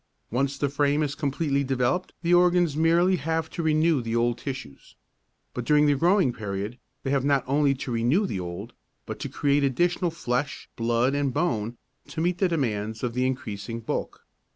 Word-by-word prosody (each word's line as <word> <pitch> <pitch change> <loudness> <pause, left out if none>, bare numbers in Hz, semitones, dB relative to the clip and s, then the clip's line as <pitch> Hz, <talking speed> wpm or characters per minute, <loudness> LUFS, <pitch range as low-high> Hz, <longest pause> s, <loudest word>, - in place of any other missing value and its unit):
Once 135 +3 0
the 145 - +1
frame 145 +2 +1
is 145 -1 -2
completely 140 -1 0
developed 130 +6 0
the 170 +1 +2
organs 175 -3 +4
merely 170 +4 +3
have 160 +1 -2
to - - -4
renew 155 -2 +3
the 115 0 -3
old 120 0 +2
tissues. 120 - -8 0.6
But 125 - -3
during 150 +4 +4
the 145 - +4
growing 170 -1 +3
period 105 +2 -5 0.2
they 135 - -2
have 140 -2 +2
not 140 -2 +2
only 140 +1 +2
to 130 -1 -5
renew 120 - +2
the 100 - -3
old 90 +6 -6 0.3
but - - -6
to - - -4
create 145 0 +1
additional 175 +6 +1
flesh, 140 -3 -3
blood 120 +3 +1
and 140 -1 0
bone 120 -7 -1 0.3
to 160 - -6
meet 175 +2 0
the 190 - +3
demands 110 -8 -2
of 120 -2 -1
the 125 +1 +1
increasing 115 -3 -4
bulk. 115 - -4
140 Hz, 180 wpm, -26 LUFS, 120-160 Hz, 0.6 s, organs